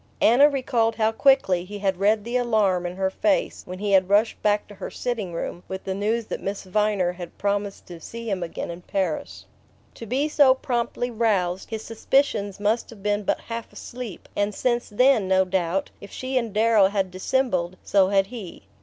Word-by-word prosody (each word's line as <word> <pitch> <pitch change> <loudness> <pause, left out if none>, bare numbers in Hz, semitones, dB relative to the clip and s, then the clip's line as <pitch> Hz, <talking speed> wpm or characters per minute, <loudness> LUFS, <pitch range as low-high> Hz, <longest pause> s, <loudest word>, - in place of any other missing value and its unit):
Anna 270 +6 +6
recalled 240 -5 0
how 220 -1 +2
quickly 225 -8 +3
he 205 +3 -8
had 195 -2 -1
read 210 +1 +3
the 235 +3 -4
alarm 210 -7 +2
in 175 - -6
her 190 0 0
face 295 +8 0
when 185 0 -6
he 205 +1 -2
had 190 -1 +4
rushed 210 +3 +2
back 210 0 +1
to 210 - -12
her 195 - -7
sitting 230 -7 -3
room 170 +1 -5
with 190 0 -6
the 190 - -3
news 215 +4 -1
that - - -5
Miss 195 +1 -4
Viner 200 -2 +1
had 175 -1 -9
promised 200 0 -2
to 175 -2 -10
see 230 +7 -8
him 195 -4 -1
again 170 0 -4
in 170 +1 -9
Paris. 180 -3 -3 0.5
To 230 - -9
be 270 +7 0
so 285 -4 +5
promptly 245 -1 -2
roused, 195 -6 0
his 220 -1 -5
suspicions 220 -4 0
must 215 +3 0
have 210 -4 -13
been 205 0 +1
but 205 - -1
half 230 0 -6
asleep; 240 -6 -8
and 205 0 0
since 240 -1 0
then, 230 -1 +3
no 190 0 +3
doubt, 185 0 -1
if 200 - -10
she 260 +5 -5
and 235 -3 0
Darrow 215 -1 +4
had 195 -2 -1
dissembled, 185 -3 -1
so 195 -2 +3
had 195 -1 +3
he. 200 - -9
205 Hz, 200 wpm, -24 LUFS, 190-230 Hz, 0.5 s, Anna